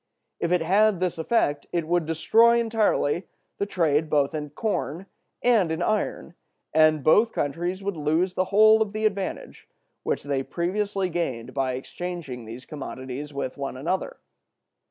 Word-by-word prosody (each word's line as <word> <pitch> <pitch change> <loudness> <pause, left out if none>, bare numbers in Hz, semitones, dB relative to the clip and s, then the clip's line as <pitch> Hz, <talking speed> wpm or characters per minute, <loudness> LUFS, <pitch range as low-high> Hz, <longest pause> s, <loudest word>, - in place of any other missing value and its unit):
If 170 - -1
it 180 -1 +3
had 200 +3 +3
this 180 -2 -1
effect, 155 -5 0
it 170 -2 -1
would 175 -2 +1
destroy 225 +9 +4
entirely 215 -7 +1 0.3
the 200 - 0
trade 155 -5 +1
both 145 0 +2
in 150 -1 -4
corn 175 0 -3 0.4
and 220 -9 +3
in 160 +2 -1
iron, 210 -4 -1 0.4
and 155 -1 +4
both 215 - +5
countries 175 +6 -2
would 200 -1 -2
lose 160 +4 0
the 185 - 0
whole 215 +3 +6
of 210 -2 0
the 215 0 -1
advantage 200 -2 -3 0.3
which - - -2
they 140 -1 -1
previously 195 +5 -1
gained 130 -8 -3
by 135 -2 0
exchanging 140 -2 -6
those 115 +4 -9
commodities 135 -1 -7
with 140 -2 -4
one 140 -2 -4
another. 190 - -2
170 Hz, 155 wpm, -25 LUFS, 145-200 Hz, 0.4 s, whole